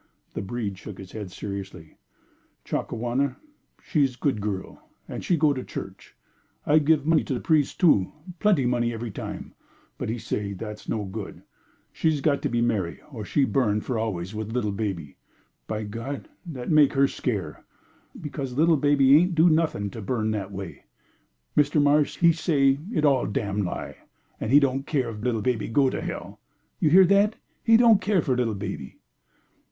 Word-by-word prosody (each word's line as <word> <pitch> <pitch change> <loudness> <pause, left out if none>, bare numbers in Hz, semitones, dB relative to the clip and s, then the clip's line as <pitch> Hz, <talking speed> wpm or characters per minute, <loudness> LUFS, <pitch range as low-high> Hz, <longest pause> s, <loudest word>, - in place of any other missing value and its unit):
The - - -3
breed 100 -2 -4
shook 105 -3 -9
his 95 -1 -10
head 105 -4 -6
seriously. 95 -4 -7 0.7
"Chakawana 125 +4 -1 0.5
she's 140 -6 +1
good 125 -5 -1
girl, 100 -2 -5 0.2
and - - -6
she 175 - +2
go 150 -1 +3
to 130 -2 -5
church; - - -8 0.5
I 150 +1 +5
give 150 -1 +2
money 160 0 +3
to 135 - -2
the - - -2
pries' 155 -4 +2
too, 145 - +3 0.3
plenty 195 -11 +3
money 120 -1 +1
every 115 0 -5
time, - - -7 0.5
but - - -3
he 115 - -2
says 100 -3 -4
that's 105 +1 -8
no 105 -2 -1
good 95 - -7 0.5
she's 155 -2 +1
got 140 0 +1
to - - -1
be 120 0 0
marry 105 -8 -1
or 115 -6 -6
she'll 135 +6 +1
burn 110 -6 +1
for 120 -1 -2
always 95 -4 -3
with 110 0 -5
little 115 -4 0
baby. 95 -8 -4 0.5
By 110 0 -3
God! 115 - -6 0.2
that's 135 -3 -5
make 150 -2 +5
her 140 0 +4
scare', - - -4 0.6
because 140 -6 -5
little 160 +1 +4
baby 140 -1 +5
ain't 175 +2 +2
do 165 +2 +5
nothing 155 -11 0
to 115 - -7
burn 110 +1 -1
that 100 -2 -3
way. 95 -2 -8 0.7
Mr. 150 +1 +3
Marsh 145 +1 +3
he 170 -1 +5
say 140 -4 +2
it's 155 -10 +1
all 135 -3 +3
damn 105 0 -1
lie, 90 - -4 0.4
and 110 - -3
he 145 - +8
don't 135 0 0
care 130 -6 0
if 105 -1 -8
little 115 -3 -1
baby 120 -3 0
do 115 - -8
go 135 0 +4
to - - -3
hell. - - -6 0.4
You 155 - +3
hear 185 +4 +7
that? 200 +3 +3 0.3
He 225 -1 +6
don't 230 -4 +6
care 190 -4 +1
for 130 - +1
little 120 -4 0
baby." 75 -8 -6
125 Hz, 180 wpm, -25 LUFS, 105-150 Hz, 0.7 s, he